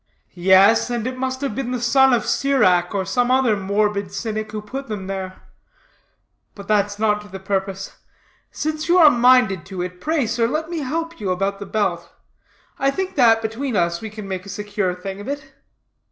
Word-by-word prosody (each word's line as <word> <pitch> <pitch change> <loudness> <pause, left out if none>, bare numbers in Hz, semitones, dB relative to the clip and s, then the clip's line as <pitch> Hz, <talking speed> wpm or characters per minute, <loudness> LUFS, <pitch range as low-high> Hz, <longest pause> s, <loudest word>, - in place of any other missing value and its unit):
"Yes, 190 +6 +5
and 240 -2 -2
it 255 0 -3
must 260 +1 -3
have 275 -6 -2
been 245 +2 -3
the 250 -1 -2
Son 265 +3 +4
of 240 -3 +2
Sirach, 185 -10 +2
or 190 -1 -1
some 245 +6 0
other 255 -4 +3
morbid 200 0 -1
cynic, 215 +1 -4
who 215 - -4
put 265 +6 -7
them 210 -4 -5
there. 190 -1 -6 1.1
But 200 -1 -11
that's 205 -1 +1
not 210 -1 +1
to 210 - -13
the 195 -1 -9
purpose. 195 0 -3 0.5
Since 310 +1 -3
you 355 - +5
are 315 -4 +8
minded 240 - +4
to 190 -3 -4
it, 180 0 -7
pray, 310 -4 0
sir, 230 +1 0
let 315 +6 -3
me 335 - -2
help 330 +3 -4
you 200 -3 -3
about 195 +2 -1
the 200 - -7
belt. 190 -5 -1 0.7
I 275 - +2
think 375 +6 -3
that, 225 -4 +4
between 230 +3 -3
us, 170 -2 0
we 220 - -6
can 210 -1 -9
make 190 -1 -4
a 200 - -11
secure 200 -2 -2
thing 195 +2 -7
of - - -9
it." 275 -1 -6
215 Hz, 195 wpm, -21 LUFS, 195-260 Hz, 1.1 s, are